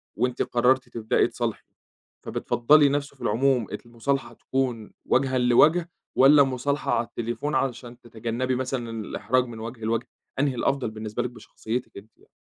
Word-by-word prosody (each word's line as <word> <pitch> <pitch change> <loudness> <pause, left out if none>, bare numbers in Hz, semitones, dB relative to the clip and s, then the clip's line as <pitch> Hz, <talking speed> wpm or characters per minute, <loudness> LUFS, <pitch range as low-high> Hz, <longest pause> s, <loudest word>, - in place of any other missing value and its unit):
وأنتِ 125 +2 -1
قرّرتِ 125 +2 +2
تبدئي 110 -1 +1
تصالحي، - - -4 0.6
فبتفضّلي 145 +4 +3
نَفْسه 140 0 -2
في - - -22
العموم 125 0 +1 0.2
المُصالحة 120 +1 -2
تكون 125 -3 -3
وجهًا 130 0 +2
لوَجه، 155 +8 +4 0.3
والّا 140 +2 +7
مُصالحة 135 +3 -1
على 115 0 +1
التليفون 120 +6 -3
علشان 125 -2 -2
تتجنّبي 120 +2 -3
مثلًا 130 -2 -3
الإحراج 120 +4 0
من 115 -2 -9
وَجه 115 +1 -7
لوَجه، 115 +2 -1 0.3
أنهي 140 -2 +1
الأفضل 135 -1 0
بالنسبة 110 -1 -4
لِك 125 - -3
بشخصيتِك 120 0 -6
أنتِ 105 +2 -12
يع - - -24
125 Hz, 145 wpm, -25 LUFS, 115-135 Hz, 0.6 s, والّا